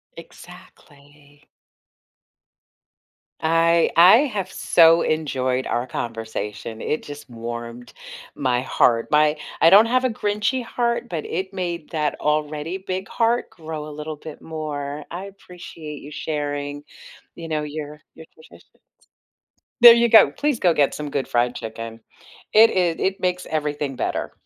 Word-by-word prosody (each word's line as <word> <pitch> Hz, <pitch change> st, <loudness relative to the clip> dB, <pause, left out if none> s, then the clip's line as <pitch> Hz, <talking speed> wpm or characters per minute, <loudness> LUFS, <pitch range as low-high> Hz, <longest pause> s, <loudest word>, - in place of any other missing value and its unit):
Exactly. 145 Hz, 0 st, -16 dB, 2.0 s
I 165 Hz, +1 st, +3 dB
I 180 Hz, +6 st, +9 dB
have 210 Hz, -10 st, -2 dB
so 165 Hz, 0 st, +4 dB
enjoyed 130 Hz, -5 st, -1 dB
our 120 Hz, +2 st, -2 dB
conversation. 110 Hz, -2 st, -6 dB
It 155 Hz, -, -2 dB
just 145 Hz, -1 st, -10 dB
warmed 120 Hz, +1 st, -8 dB, 0.4 s
my 125 Hz, -2 st, 0 dB
heart. 120 Hz, -2 st, +2 dB
My 150 Hz, 0 st, +3 dB, 0.2 s
I 165 Hz, -, +7 dB
don't 200 Hz, +5 st, +8 dB
have 255 Hz, +2 st, +1 dB
a -, -, +2 dB
grinchy 215 Hz, +4 st, -1 dB
heart, 235 Hz, 0 st, -2 dB
but 165 Hz, -4 st, -4 dB
it 190 Hz, +3 st, -4 dB
made 175 Hz, -4 st, -4 dB
that 150 Hz, -3 st, -1 dB
already 150 Hz, +3 st, -2 dB
big 190 Hz, 0 st, -5 dB
heart 235 Hz, +1 st, 0 dB
grow 155 Hz, -2 st, -8 dB
a -, -, -8 dB
little 150 Hz, +1 st, -6 dB
bit 155 Hz, 0 st, -11 dB
more. 150 Hz, -2 st, -5 dB
I 180 Hz, +3 st, -6 dB
appreciate 175 Hz, -6 st, -11 dB
you 145 Hz, -, -11 dB
sharing, 145 Hz, -1 st, -4 dB, 0.5 s
you 165 Hz, -, -8 dB
know, 155 Hz, -1 st, -2 dB
your 150 Hz, 0 st, -7 dB
your 160 Hz, -, -12 dB
traditions. 160 Hz, -, -20 dB, 1.0 s
There 240 Hz, -1 st, +11 dB
you 235 Hz, 0 st, +3 dB
go. 220 Hz, -, +7 dB
Please 290 Hz, -5 st, -1 dB
go 175 Hz, -2 st, +3 dB
get 145 Hz, -3 st, +2 dB
some 150 Hz, -1 st, -5 dB
good 140 Hz, -1 st, -2 dB
fried 120 Hz, +1 st, 0 dB
chicken. 115 Hz, 0 st, -7 dB, 0.5 s
It 225 Hz, +1 st, +7 dB
i 175 Hz, -3 st, 0 dB
it 190 Hz, +1 st, -1 dB
makes 180 Hz, 0 st, -1 dB
everything 150 Hz, -3 st, -2 dB
better. -, -, -3 dB
155 Hz, 140 wpm, -22 LUFS, 145-185 Hz, 2.0 s, There